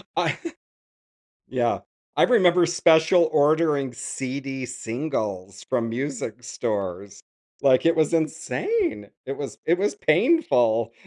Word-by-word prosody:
I - - 0 1.1
yeah, - - 0 0.4
I - - +4
remember 180 -7 +4
special 165 0 +4
ordering 150 -3 +2
CD 135 +1 -5
singles 110 -6 -4
from 115 -1 0
music 125 -2 -4
stores. 100 -5 -4 0.4
Like, 135 +2 +4
it 165 0 +3
was 155 0 +2
insane. 165 - -1 0.2
It 135 +1 -5
was 140 - -6
it 175 +2 +2
was 205 - 0
painful. 120 - +2
140 Hz, 110 wpm, -24 LUFS, 115-165 Hz, 1.1 s, I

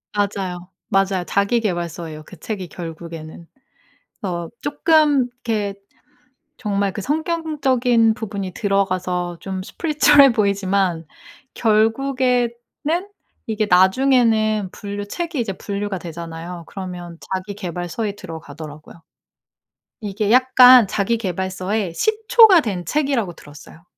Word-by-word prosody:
맞아요. 190 -3 -2 0.2
맞아요. 195 -1 +1
자기계발서예요 175 -7 -1
그 185 - -13
책이 195 0 -5
결국에는. 165 -1 -9 0.8
어 175 -4 -3
쪼끔 290 -2 +3 0.2
이렇게 210 -4 -1 0.8
정말 200 -3 -1
그 205 - -5
성경적인 275 - +1
부분이 200 -4 -5
들어가서 185 -3 -1
좀 190 -1 -5
spiritual해 295 - +4
보이지만 195 -5 0 0.5
결국에는 245 +3 +2 1.0
이게 215 -1 0
나중에는 215 +1 +3
분류 205 0 -6
책이 335 +6 -4
이제 225 -4 -2
분류가 200 0 -4
되잖아요? 170 +1 -8
그러면 180 -3 -7 0.2
자기계발서에 190 +1 -4
들어가더라고요. 155 -3 -10 1.0
이게 205 0 -2
약간 255 -2 +7
자기계발서의 190 -2 -2
시초가 435 - +5
된 190 -6 -3
책이라고 265 - -1
들었어요. 145 +3 -15
200 Hz, 290 characters per minute, -20 LUFS, 180-240 Hz, 1.0 s, 약간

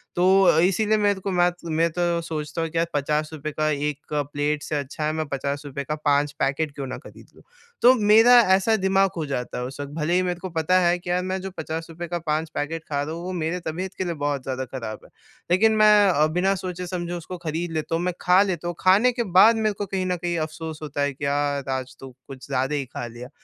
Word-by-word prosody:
तो 175 - +1 0.2
अ, 160 - +5
इसीलिए 210 +5 +2
मेरे 205 -2 +1
को 195 +1 -3
मैत 175 0 +2
मैं 165 +1 +1
तो 175 0 0
सोचता 160 0 -4
हूँ 165 - -2
कि 165 - -5
यार 165 0 +2
₹50 150 +1 -2
का 155 +1 0
1 150 0 -3
प्लेट 145 0 -1
से 155 - -3
अच्छा 145 +1 -4
है 155 - +1
मैं 155 0 -2
₹50 140 0 -4
का 150 +3 -3
5 145 0 +2
पैकेट 145 +3 0
क्यों 135 -2 -5
ना - - -5
ख़रीद - - -14
लूँ। - - -19 0.4
तो 250 +2 +8
मेरा 220 +2 +6 0.2
ऐसा 220 +4 +2
दिमाग 195 -1 +2
हो 160 - -2
जाता 130 -4 -4
है 125 - -3
उस 135 +3 -8
वक़्त 145 0 -5
भले 160 +1 -1
ही 180 - +3
मेरे 180 -1 -2
को 185 +1 -6
पता 165 +3 +2
है 175 0 +3
कि 175 - -9
यार 180 +1 +1
मैं 185 +1 -2
जो 190 0 -6
₹50 165 +2 -5
का 175 +1 -3
5 155 0 -2
पैकेट 160 +2 -3
खा 140 -2 -1
रहा 150 +2 -4
हूँ 170 +1 -6
वो 185 - -4
मेरे 170 +3 -1
तबियत 180 +4 -4
के - - -1
लिए 175 -2 -2
बहुत 145 -3 -2
ज़्यादा 130 0 -3
ख़राब 115 -5 -6
है। - - -18 0.4
लेकिन 215 +5 +5
मैं 210 -1 +6
अ, 155 -4 +3
बिना 180 +5 +1
सोचे-समझे 180 -1 -5
उसको 175 +1 -6
खरीद 165 +2 -2
लेता 160 0 -2
हूँ। 170 - -1
मैं 180 0 -1
खा 180 +2 +5
लेता 175 -4 -3
हूँ। 175 - -3
खाने 200 +7 +5
के 240 -1 -2 0.2
बाद 225 +3 +7
मेरे 215 -1 0
को 205 +1 -4
कहीं 190 -1 -2
न 180 - 0
कहीं 175 0 -2
अफ़सोस 160 0 -7
होता 145 -1 -4
है 145 0 0
कि, 140 +2 -6
यार 140 -1 -1
आज 130 0 -3
तो 135 - -9 0.2
कुछ 135 -2 -10
ज़्यादा 135 +1 -1
ही 140 -2 -2
खा 120 -1 -6
लिया। 120 +2 -10
165 Hz, 245 wpm, -24 LUFS, 145-180 Hz, 0.4 s, तो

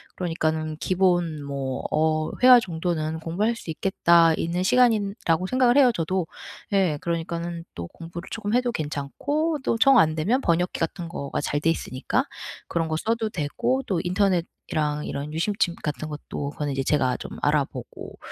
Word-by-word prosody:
그러니깐 155 -3 -1
기본 175 -5 +1
뭐 135 -2 -4
어 155 0 +1
회화 250 -1 +9
정도는 160 -4 -2
공부할 200 +9 -1
수 180 - -10
있겠다 170 -1 +4
있는 175 +2 -2
시간이라고 200 -6 +2
생각을 255 +1 +3
해요, 265 -3 +6
저도. 175 0 -1 0.5
예. 180 -7 +2
그러니까는 170 0 -3
또 85 0 -5
공부를 170 - -9
쪼금 215 -1 -3
해도 245 0 +2
괜찮고, 280 - -2
또 230 - +1
정 265 +3 +6
안 155 -6 +4
되면 215 - +1
번역기 175 -2 0
같은 170 +1 -3
거가 140 -5 -4
잘 145 0 -1
돼 165 - +2
있으니까 130 -5 -1 0.4
그런 165 -1 -1
거 155 - -1
써도 225 +3 -1
되고, 210 - -1
또 180 -4 0
인터넷이랑 170 -5 -1
이런 145 +2 -4
유심칩 175 +1 0
같은 155 +1 -3
것도 145 -1 -5
그거는 145 -1 -3
이제 135 0 -1
제가 130 -3 +1
좀 - - -8
알아보고. 145 -4 -2
170 Hz, 340 characters per minute, -25 LUFS, 155-200 Hz, 0.5 s, 회화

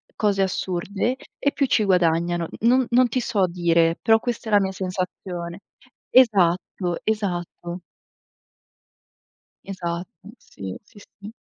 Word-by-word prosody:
cose 200 -2 +1
assurde, 190 +5 -2 0.2
e 285 - +1
più 280 - +1
ci 235 -4 +2
guadagnano. 170 -2 +2
Non 250 +3 +4
non 250 +1 +5
ti 250 +2 -1
so 210 -6 +1
dire. 170 -1 +2
Però 225 0 +4
questa 235 -1 -4
è - - -4
la 205 - +7
mia 190 0 -1
sensazione 180 -1 -5 0.5
Esatto, 185 -6 +3
esatto. 175 -4 -3 1.9
Esatto. 175 0 -6
Sì, 95 -1 -8
sì, 210 - -19 0.2
sì. 205 +2 -9
190 Hz, 120 wpm, -23 LUFS, 175-220 Hz, 1.9 s, la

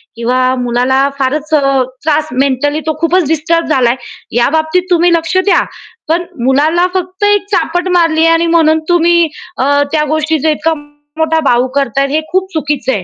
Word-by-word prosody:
किंवा 240 +2 -1 0.2
मुलाला 250 +3 +1
फारच 295 +4 -2
अ, 275 -3 +2 0.2
त्रास 305 0 0
मेंटली 275 +3 0
तो 310 - -1
खूपच 335 -1 +2
डिस्टर्ब 325 +2 0
झालाय. 250 -5 +2 0.4
या 240 0 +3
बाबतीत 315 +4 0
तुम्ही 350 0 +3
लक्ष 330 +2 0
द्या. 405 - +3 0.4
पण 335 +3 0 0.2
मुलाला 300 +7 +2
फक्त 370 +1 -4
एक 410 -1 +2
चापट 360 -2 0
मारली 330 -3 +2
आहे - - +4
आणि 330 +1 +1
म्हणून 315 -1 +3
तुम्ही 340 -1 +3 0.3
अ, 285 +2 +2
त्या 305 -1 +1
गोष्टीचा 310 0 0
इतका 315 +1 0 0.4
मोठा 320 0 +1
बाऊ 245 -1 +2
करताय 275 0 0
हे 300 +3 0
खूप 375 +1 -1
चुकीचं 295 -5 -2
आहे. 205 -7 -2
315 Hz, 165 wpm, -12 LUFS, 275-335 Hz, 0.4 s, आहे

